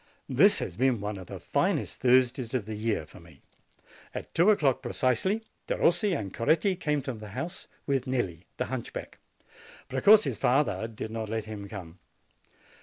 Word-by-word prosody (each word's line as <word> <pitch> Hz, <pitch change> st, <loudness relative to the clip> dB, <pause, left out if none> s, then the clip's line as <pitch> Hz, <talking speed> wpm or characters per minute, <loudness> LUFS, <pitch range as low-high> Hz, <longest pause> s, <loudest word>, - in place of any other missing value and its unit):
This -, -, +5 dB
has 85 Hz, -, -4 dB
been 130 Hz, -2 st, +2 dB
one 105 Hz, 0 st, -4 dB
of 90 Hz, -, -10 dB
the -, -, -7 dB
finest -, -, -1 dB
Thursdays 130 Hz, 0 st, +3 dB
of 120 Hz, -6 st, -1 dB
the 110 Hz, -, -5 dB
year 105 Hz, -6 st, -1 dB
for -, -, -15 dB
me. 85 Hz, -4 st, -18 dB, 0.7 s
At -, -, -6 dB
two 175 Hz, +5 st, +5 dB
o'clock, 140 Hz, -, +3 dB
percisely, 130 Hz, -, 0 dB, 0.2 s
Derossi 195 Hz, +2 st, +2 dB
and 100 Hz, -3 st, -6 dB
Coretti 165 Hz, -, +2 dB
came 150 Hz, -5 st, -1 dB
to 130 Hz, -, -3 dB
the 110 Hz, -2 st, -9 dB
house, 175 Hz, +7 st, -4 dB, 0.2 s
with 135 Hz, -2 st, 0 dB
Nelli, 95 Hz, -10 st, -2 dB
the -, -, -1 dB
hunchback. 130 Hz, -1 st, -6 dB, 0.7 s
Precossi's 135 Hz, -, +5 dB
father 130 Hz, -3 st, +2 dB
did 110 Hz, -1 st, -7 dB
not 110 Hz, -1 st, -4 dB
let 110 Hz, -1 st, -2 dB
him 105 Hz, -2 st, -7 dB
come. 90 Hz, -4 st, -9 dB
120 Hz, 165 wpm, -28 LUFS, 105-140 Hz, 0.7 s, This